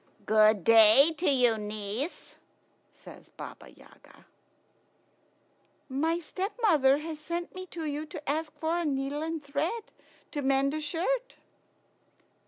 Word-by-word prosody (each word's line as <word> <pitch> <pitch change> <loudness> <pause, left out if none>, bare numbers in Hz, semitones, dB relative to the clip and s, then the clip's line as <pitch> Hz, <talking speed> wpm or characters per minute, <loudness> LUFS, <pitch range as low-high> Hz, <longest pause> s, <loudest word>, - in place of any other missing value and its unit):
"Good 215 -2 +4
day 230 - +7
to 360 - +2
you, 245 -5 +3
niece," 210 - -5 0.5
says - - -15
Baba - - -11
Yaga. - - -20 1.6
"My 315 +6 0
stepmother 345 - +1
has 310 0 -6
sent 340 +3 -5
me 370 0 -8
to 330 -2 -6
you 300 +1 -4
to 300 0 -10
ask 310 +2 -2
for 325 +3 -1
a - - -1
needle 280 0 -2
and 320 -1 -4
thread 315 +11 -2 0.5
to 295 - -3
mend 275 +1 +1
a 310 - -3
shirt." 420 +12 -2
300 Hz, 125 wpm, -28 LUFS, 270-330 Hz, 1.6 s, day